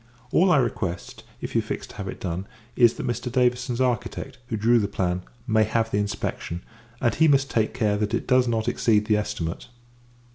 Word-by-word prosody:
All 185 +2 +4
I 155 - +6
request, 105 -8 -2 0.2
if - - -5
you - - +3
fix - - -5
to - - -14
have 100 - -5
it - - -6
done, 90 +2 -4 0.3
[is] 120 -2 +5
that - - -5
Mr. 120 +1 -2
Davison's 125 -1 +1
architect, 130 +1 -1
who 115 - -2
drew 115 +3 +4
the 100 - 0
plan, 90 -2 -1 0.2
may 110 -3 +3
have 115 +1 0
the 100 - +1
inspection; 95 -4 -3 0.4
and, 120 -3 +2
he 160 - +4
must 135 -2 +3
take 110 0 0
care 105 -4 +1
that 105 +2 0
it - - -3
does 125 -1 +4
not 115 -2 0
exceed 105 -2 +2
the 105 -1 +3
estimate. 105 -5 -3
115 Hz, 205 wpm, -25 LUFS, 105-125 Hz, 0.4 s, I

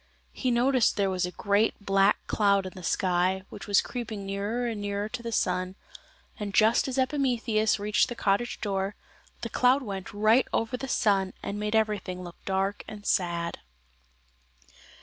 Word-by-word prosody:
He 255 - -1
noticed 245 0 +3
there 195 -2 +2
was 180 -1 0
a - - -6
great 205 +4 +1
black 195 0 +2
cloud 200 -2 +2
in 185 - -6
the 185 - -10
sky, 185 +1 +1
which - - -9
was 200 -1 +4
creeping 220 -5 -5
nearer 200 +5 -2
and 225 -3 -3
nearer 205 0 -2
to 235 +3 -6
the 235 0 -5
sun, 185 -3 0 0.6
and 200 -2 -4
just 220 +6 +4
as 265 0 -3
Ejpimetheus 245 -6 +1
reached 210 0 +1
the 240 - -5
cottage 205 +3 0
door 195 -1 -1 0.5
the - - -4
cloud 255 +2 +3
went 195 -4 -5
right 215 +5 +3
over 225 +3 0
the 270 +2 -5
sun 195 -6 +1
and 205 - -4
made 210 +1 -1
everything 205 -4 0
look 175 -1 -11
dark 195 +1 -1
and 210 -1 -9
sad. 170 -2 0
205 Hz, 170 wpm, -27 LUFS, 195-230 Hz, 0.6 s, was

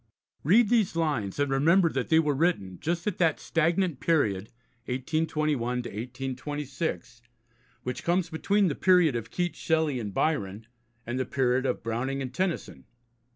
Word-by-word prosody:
Read 210 - +5
these 220 -8 +2
lines, 145 - -1
and 145 -1 0
remember 165 +7 +4
that 135 -5 -2
they 160 - +5
were 150 -3 +3
written 135 - 0
just 170 +1 -2
at 210 - -2
that 165 -4 +2
stagnant 165 -1 0
period 105 - +1 0.4
(1821 150 +2 -1 0.2
1826) 130 - -5 0.6
which 125 0 -4
comes 175 0 +1
between 200 +5 +2
the 155 - 0
period 180 -7 +4
of 115 - -4
Keats, 175 -3 -2
Shelley, 160 -5 +1
and 105 -3 -4
Byron, 105 -6 -1 0.4
and 120 +2 -3
the 130 - 0
period 130 -1 +1
of 125 - -2
Browning 120 +5 -2
and 130 -2 -5
Tennyson. 185 +3 -3
145 Hz, 150 wpm, -27 LUFS, 125-165 Hz, 0.6 s, Read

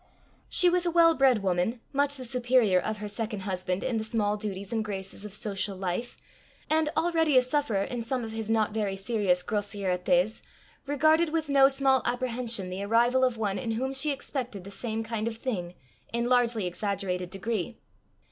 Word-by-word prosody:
She 360 - +5
was 355 0 +2
a - - +1
well 335 -1 +6
bred 260 -8 +3
woman, 185 +6 0
much 285 +1 +2
the 260 -2 -7
superior 240 -5 +3
of 215 +4 -3
her 210 0 -5
second 210 0 -3
husband 185 -1 -2
in 250 -3 -1
the 220 - -1
small 220 -2 0
duties 200 -1 -4
and 225 -1 0
graces 195 -1 -6
of 210 - -7
social 200 -1 -3
life, 190 +6 -3 0.5
and, 315 -1 +3
already 325 -3 +3
a - - +8
sufferer 250 -7 0
in 240 +3 -4
some 245 +2 -2
of 225 - -5
his 220 -1 -5
not 220 -2 +2
very 205 -3 -1
serious 195 -3 0
grossièretés, 195 -1 0 0.5
regarded 310 +3 +3
with 315 -1 -2
no 275 -1 +6
small 270 -1 +2
apprehension 240 -6 -1
the 185 +2 -4
arrival 240 +5 +3
of 250 -3 +2
one 205 -3 -1
in 230 -3 -2
whom 260 +4 -2
she 270 +3 +2
expected 255 -7 -4
the 200 - -10
same 225 +1 -3
kind 225 -1 -3
of 225 -1 -4
thing 180 -8 -4 0.4
in 235 0 -1
largely 240 -4 +2
exaggerated 180 -1 -2
degree. 215 +3 -3
225 Hz, 185 wpm, -28 LUFS, 200-260 Hz, 0.5 s, a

